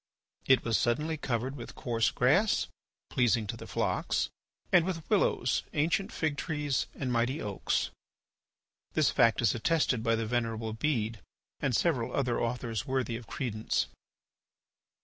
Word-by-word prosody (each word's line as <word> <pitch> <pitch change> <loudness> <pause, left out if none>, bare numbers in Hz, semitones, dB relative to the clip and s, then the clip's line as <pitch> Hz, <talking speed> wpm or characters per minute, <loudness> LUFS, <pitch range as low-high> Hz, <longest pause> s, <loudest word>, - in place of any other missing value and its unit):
It 130 -1 +5
was 115 -2 +2
suddenly 150 +7 +1
covered 130 -2 -2
with 120 -4 -8
coarse 115 -2 +1
grass, 185 - +3 0.5
pleasing 120 -3 +2
to 100 - -4
the - - -9
flocks, - - 0 0.4
and 180 - +6
with 165 -3 -4
willows, - - +2
ancient 170 +6 +1
figtrees, 150 -2 -1
and 130 -3 -2
mighty 120 +5 +1
oaks. 100 -2 -1 1.0
This - - +3
fact 115 +1 +4
is 115 - +4
attested 125 -1 +1
by 115 0 +2
the 115 0 -1
Venerable 115 -1 -1
Bede 115 -3 -1 0.4
and 135 -4 0
several 130 -8 +1
other 125 -4 +1
authors 115 -3 -2
worthy 130 -3 0
of 115 -2 -8
credence. 110 0 -1
125 Hz, 135 wpm, -30 LUFS, 115-145 Hz, 1.0 s, and